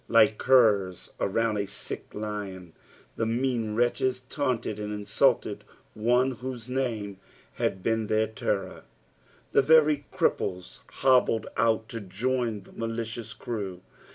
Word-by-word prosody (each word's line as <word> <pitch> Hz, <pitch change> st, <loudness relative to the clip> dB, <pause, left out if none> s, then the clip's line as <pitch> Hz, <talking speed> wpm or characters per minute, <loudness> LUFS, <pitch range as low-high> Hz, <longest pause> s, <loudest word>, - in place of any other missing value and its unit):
Like 110 Hz, -2 st, +5 dB
curs 105 Hz, -8 st, +3 dB
around 110 Hz, +2 st, +1 dB
a 100 Hz, -, -1 dB
sick 100 Hz, -, -6 dB
lion, 100 Hz, -5 st, -5 dB, 0.4 s
the 115 Hz, -, 0 dB
mean 115 Hz, -2 st, 0 dB
wretclies 125 Hz, +2 st, +1 dB
taunted 125 Hz, -7 st, -1 dB
and 105 Hz, 0 st, -4 dB
insulted 105 Hz, -1 st, +1 dB, 0.3 s
one 125 Hz, +4 st, +2 dB
whose 125 Hz, -1 st, -6 dB
name 115 Hz, -7 st, -2 dB, 0.3 s
had 95 Hz, -1 st, -2 dB
been 110 Hz, -1 st, 0 dB
their 110 Hz, +1 st, +2 dB
terror. 100 Hz, -3 st, -3 dB, 0.7 s
The -, -, +5 dB
very 150 Hz, 0 st, +4 dB
cripples 90 Hz, 0 st, -1 dB
hobbled 125 Hz, -4 st, +3 dB
out 110 Hz, -1 st, +2 dB
to 115 Hz, -, -5 dB
join 115 Hz, +2 st, -1 dB
the -, -, -18 dB
malicious 115 Hz, 0 st, -4 dB
crew. 100 Hz, -7 st, -5 dB
115 Hz, 125 wpm, -27 LUFS, 105-125 Hz, 0.7 s, Like